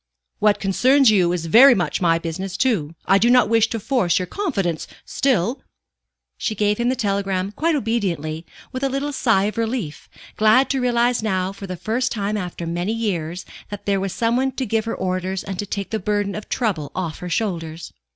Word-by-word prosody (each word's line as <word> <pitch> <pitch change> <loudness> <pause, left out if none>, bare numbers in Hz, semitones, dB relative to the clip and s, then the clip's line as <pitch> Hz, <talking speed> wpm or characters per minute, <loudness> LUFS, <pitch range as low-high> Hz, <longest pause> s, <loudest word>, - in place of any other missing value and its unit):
"What 210 -1 +3
concerns 255 +6 +4
you 180 -5 +3
is 175 -2 -2
very 245 - +7
much 175 -3 -1
my 165 -2 +3
business, 180 +3 -5
too. 175 - 0
I 195 - +4
do 235 +4 +3
not 250 -3 +5
wish 225 -1 +4
to 225 - -4
force 225 -6 +1
your 185 - -1
confidence, 195 - -2 0.2
still 245 -2 0 0.4
" - - -60
She 215 - -2
gave 210 +1 +1
him 240 +1 +1
the 260 - +1
telegram 195 -4 -1
quite 320 +9 0
obediently, 180 - -2 0.3
with 255 - -5
a 275 - +2
little 275 +2 -2
sigh 225 -7 +2
of 215 +2 -2
relief, 225 - -3 0.3
glad 220 +5 +4
to 270 -2 0
realize 245 -1 +2
now, 190 -3 -1
for 195 0 -9
the 185 -1 -5
first 240 +7 -1
time 210 -1 -2
after 180 -4 -4
many 175 +5 -2
years, 180 -6 -3 0.2
that 205 -1 -8
there 200 -1 +1
was 195 0 -2
some 230 +4 0
one 265 +1 0
to 260 0 -3
give 220 0 0
her 225 - -3
orders 185 0 -2
and 195 -2 -6
take 200 -2 -4
the 220 - -1
burden 205 0 -1
of 210 - -7
trouble 175 - -1
off 170 -5 -3
her 180 - -6
shoulders. 165 -5 -3
205 Hz, 200 wpm, -21 LUFS, 180-235 Hz, 0.4 s, very